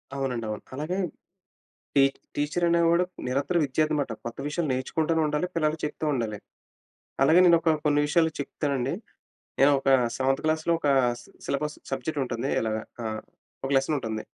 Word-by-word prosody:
అవునండి 130 -4 -2
అవును. 105 - -4
అలాగే, 155 +7 -2 1.1
ఈ - - +8 0.3
టిచరనేవాడు 170 +3 +2 0.2
నిరంతర 140 +7 0
విద్యార్థనమాట. 145 -1 0
కొత్త 120 0 -6
విషయాలు 155 +1 -1
నేర్చుకుంటూనే 160 +5 0
ఉండాలి. 150 +3 0
పిల్లలకి 155 -1 0
చెప్తూ 150 - -3
ఉండాలి. 110 -4 -2 0.8
అలాగే 160 +6 +6
నేను 170 -1 +7
ఒక 165 -1 +3
కొన్ని 145 -1 +3
విషయాలు 160 +1 +3
చెప్తానండి. 140 -1 -2 0.7
నేను 140 +2 +7
ఒక 135 - -2 0.3
సెవెంత్ 135 +1 +1
క్లాస్‌లో 160 +1 +1
ఒక 145 - 0 0.6
సిలబస్ 150 +2 -2
సబ్జెక్ట్ 135 +3 -2
ఉంటుంది. 120 +1 -3
ఇలాగా 110 -1 -1 0.2
ఆహ్, 110 -1 -3 0.4
ఒక 135 - -2
లెసన్ 135 +3 +2
ఉంటుంది. 110 -4 -4
145 Hz, 140 wpm, -27 LUFS, 130-160 Hz, 1.1 s, ఈ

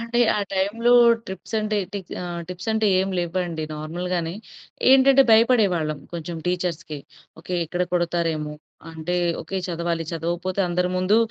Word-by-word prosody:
అంటే, 235 +1 -1 0.2
ఆ - - 0
టైంలో 215 +6 +1 0.3
ట్రిప్స్ 190 +4 -7
అంటే 215 0 -1 0.2
టిక్స్ 190 -3 -6
ఆహ్, 175 -1 -5
టిప్స్ 180 +3 -7
అంటే 220 -1 +1
ఏం 190 - -1
లేవండి. 170 -2 -2
నార్మల్‌గానే 170 +2 -3 0.6
ఏంటంటే 270 0 +7
భయపడేవాళ్ళం 200 - +3 0.2
కొంచెం 170 0 -5
టీచర్స్‌కి. 170 -4 -2 0.4
ఓకే, 180 +2 -5
ఇక్కడ 175 +2 -1
కొడతారేమో 165 -3 -1 0.4
అంటే 160 +2 -4 0.3
ఓకే, 195 - -5
చదవాలి 170 -1 -2
చదవపోతే 175 +4 -2
అందరి 180 +1 0
ముందు 185 +4 +3
180 Hz, 135 wpm, -23 LUFS, 165-200 Hz, 0.6 s, ఏంటంటే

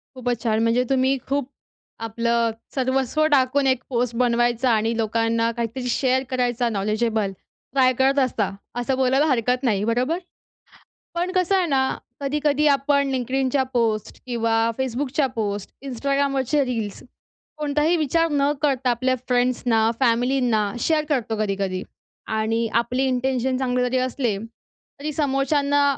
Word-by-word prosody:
खूपच 245 -2 -2
छान. 220 -1 +1
म्हणजे 230 +2 +2
तुम्ही 265 0 +2
खूप 280 -1 -1 0.6
आपलं 230 +1 0 0.2
सर्वस्व 265 +3 +1
टाकून 270 0 +3
एक 260 -1 +1
पोस्ट 240 -2 -1
बनवायचा 240 0 +2
आणि 225 +1 +1
लोकांना 230 +1 +1
काहीतरी 235 +2 -4
शेअर 260 +2 +1
करायचा 245 -1 0
नॉलेजेबल, 215 0 0 0.4
ट्राय 255 -2 +4
करत 270 +1 +3
असता 240 -6 +1 0.3
असं 260 +2 0
बोलायला 265 +3 +3
हरकत 250 -1 +1
नाही. 210 -6 +1
बरोबर. 250 +9 0 1.0
पण 355 +2 -1
कसं 370 +1 +2
आहे 370 - +2
ना, 265 -2 +1 0.2
कधी-कधी 295 +1 +1
आपण 280 0 +2
Linkedinच्या 265 +1 0
पोस्ट 220 -3 -1
किंवा 230 -2 -1 0.3
Facebookच्या 265 +2 0
पोस्ट, 205 -2 -3 0.2
Instagramवरचे 275 +2 0
रील्स 225 -5 -4 0.6
कोणताही 300 +2 +1
विचार 330 +2 +2
न 285 0 +2
करता 265 -3 +1
आपल्या 255 +2 +1
फ्रेंड्सना, 245 -3 +2
फॅमिलींना 245 -2 +2 0.2
शेअर 310 +3 +1
करतो 240 -6 0
कधी-कधी 195 -3 -1 0.5
आणि 225 +1 0
आपले 250 +3 -2
इंटेन्शन 260 0 0
चांगले 250 -1 0
जरी 250 +1 0
असले 250 -4 -1 0.6
तरी 305 +1 -3
समोरच्यांना 285 0 +1
255 Hz, 130 wpm, -23 LUFS, 230-275 Hz, 1.0 s, ट्राय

